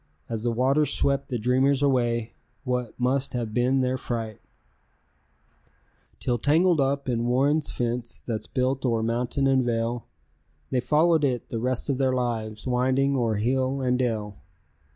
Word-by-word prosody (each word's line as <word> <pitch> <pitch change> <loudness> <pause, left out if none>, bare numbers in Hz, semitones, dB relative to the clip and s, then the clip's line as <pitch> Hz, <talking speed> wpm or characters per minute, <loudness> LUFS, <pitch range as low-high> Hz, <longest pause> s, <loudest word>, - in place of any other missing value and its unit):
As 115 -2 -3
the 120 +1 0
waters 135 +5 +2
swept 140 0 0
the 125 - -1
dreamers 130 +4 +2
away, 120 -4 +1 0.3
what 125 -3 -3
must 130 +2 0
have 115 -3 -3
been 125 +3 +2
their 130 0 0
fright, 115 -4 -4 1.8
Till 120 -1 -1
tangled 160 +4 +3
up 140 +1 0
in 120 -1 0
Warren's 140 +5 +2
fence 120 0 -3
that's 110 -2 -3
built 130 0 -1
o'er 115 -3 +1
mountain 120 +4 0
and 135 -1 +3
vale, 115 0 -2 0.6
They 125 - +2
followed 155 +5 +3
it 125 -4 -1
the 115 - -3
rest 125 +1 -1
of 140 -2 -1
their 130 -1 +2
lives, 110 -4 -2
winding 130 +2 +1
o'er 115 -4 +1
hill 130 +5 0
and 125 -1 +1
dale. 110 -5 -2
125 Hz, 150 wpm, -25 LUFS, 120-135 Hz, 1.8 s, tangled